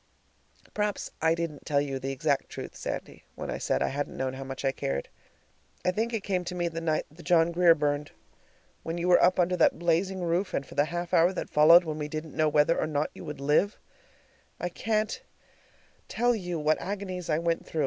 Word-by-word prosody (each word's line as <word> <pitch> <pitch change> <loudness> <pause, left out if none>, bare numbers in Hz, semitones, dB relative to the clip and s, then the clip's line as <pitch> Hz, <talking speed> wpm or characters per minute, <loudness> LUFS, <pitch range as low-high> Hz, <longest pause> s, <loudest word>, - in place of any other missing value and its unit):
Perhaps 210 -1 -2
I 160 +1 +3
didn't 165 -4 -4
tell 145 -2 +1
you 140 -2 -2
the 135 +1 -3
exact 140 +1 0
truth, - - -7
Sandy, - - -6
when - - -5
I - - -4
said - - 0
I - - 0
hadn't 145 +1 -4
known 130 0 -2
how 135 +1 -6
much 135 +1 -6
I 135 - +3
cared. 70 - -3 0.8
I 180 - +4
think 225 +5 -1
it 225 -4 -2
came 185 -3 -1
to 180 +1 -4
me 175 -1 0
the 165 0 -5
night 160 -2 0
the 165 +3 -14
John 170 -1 +3
Grier 170 -1 +5
burned. 145 -1 -1 0.7
When 165 +1 -4
you 175 +1 -1
were 180 - +6
up 185 +1 +4
under 180 +1 +3
that 170 - +4
blazing 175 +3 0
roof, 175 +3 0
and 140 - -2
for - - -13
the 145 +1 +3
half 175 +1 -4
hour 170 +2 +5
that - - -5
followed, 165 +4 +7
when 155 -2 -4
we 150 - -3
didn't 155 0 -6
know 155 -1 +3
whether 150 +3 +3
or - - 0
not 150 -1 -1
you - - -10
would 150 -2 -6
live, 150 +9 +2 0.8
I 175 - -2
can't 215 +4 -1 0.9
tell 245 +2 +2
you 180 -6 -3
what 155 0 +1
agonies 185 -2 -5
I 155 - +2
went 165 0 -1
through. 160 - -4
165 Hz, 220 wpm, -28 LUFS, 150-180 Hz, 0.9 s, followed